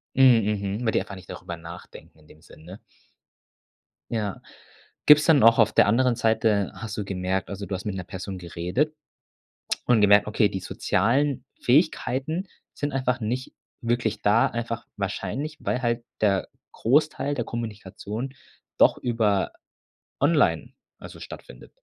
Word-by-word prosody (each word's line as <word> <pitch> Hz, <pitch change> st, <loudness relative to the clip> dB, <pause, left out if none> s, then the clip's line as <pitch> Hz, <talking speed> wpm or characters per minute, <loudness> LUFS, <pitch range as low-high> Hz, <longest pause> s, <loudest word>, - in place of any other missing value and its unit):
Mhm, 105 Hz, -6 st, +3 dB
mhm, 125 Hz, -, -4 dB
weil 110 Hz, -, +2 dB
die -, -, +2 dB
einfach 100 Hz, -, -8 dB
nicht 90 Hz, -1 st, -13 dB
drüber 85 Hz, -, -7 dB
nachdenken 85 Hz, 0 st, -12 dB
in 75 Hz, -, -22 dB
dem 75 Hz, -, -18 dB
Sinn, 80 Hz, -, -17 dB
ne? 90 Hz, +5 st, -11 dB, 1.3 s
Ja. 105 Hz, -4 st, -3 dB, 0.6 s
Gibt's 150 Hz, +1 st, +7 dB
denn 150 Hz, -8 st, +5 dB
auch 115 Hz, 0 st, +6 dB
auf 110 Hz, -, +5 dB
der -, -, +5 dB
anderen 125 Hz, +2 st, +3 dB
Seite 110 Hz, -3 st, +1 dB
hast 110 Hz, -1 st, -6 dB
du 105 Hz, -, -3 dB
gemerkt 95 Hz, -1 st, -2 dB
also, 100 Hz, 0 st, -5 dB
du 95 Hz, -, -3 dB
hast 95 Hz, -, -7 dB
mit 105 Hz, -2 st, -3 dB
'ner 95 Hz, -, -4 dB
Person 95 Hz, +1 st, -6 dB
geredet 90 Hz, -, -2 dB, 0.9 s
und 120 Hz, -3 st, +4 dB
gemerkt, 105 Hz, 0 st, +6 dB
okay, 105 Hz, -1 st, +2 dB
die 95 Hz, -, -4 dB
sozialen 130 Hz, +13 st, 0 dB, 0.2 s
Fähigkeiten 155 Hz, +4 st, +1 dB, 0.3 s
sind 145 Hz, -1 st, -3 dB
einfach 130 Hz, -1 st, 0 dB
nicht 125 Hz, +4 st, -3 dB, 0.3 s
wirklich 120 Hz, -2 st, -1 dB
da, 105 Hz, +3 st, +4 dB
einfach 115 Hz, 0 st, -4 dB
wahrscheinlich, 130 Hz, -, -4 dB
weil 125 Hz, -, -1 dB
halt 120 Hz, 0 st, -1 dB, 0.2 s
der 100 Hz, -3 st, +2 dB, 0.3 s
Großteil 145 Hz, +3 st, +1 dB
der 120 Hz, -4 st, -2 dB
Kommunikation 110 Hz, +2 st, -6 dB, 0.4 s
doch -, -, +5 dB
über 110 Hz, -5 st, 0 dB, 0.7 s
online, 150 Hz, +2 st, +2 dB, 0.3 s
also, -, -, -11 dB
stattfindet? -, -, -11 dB
110 Hz, 150 wpm, -25 LUFS, 100-125 Hz, 1.3 s, Gibt's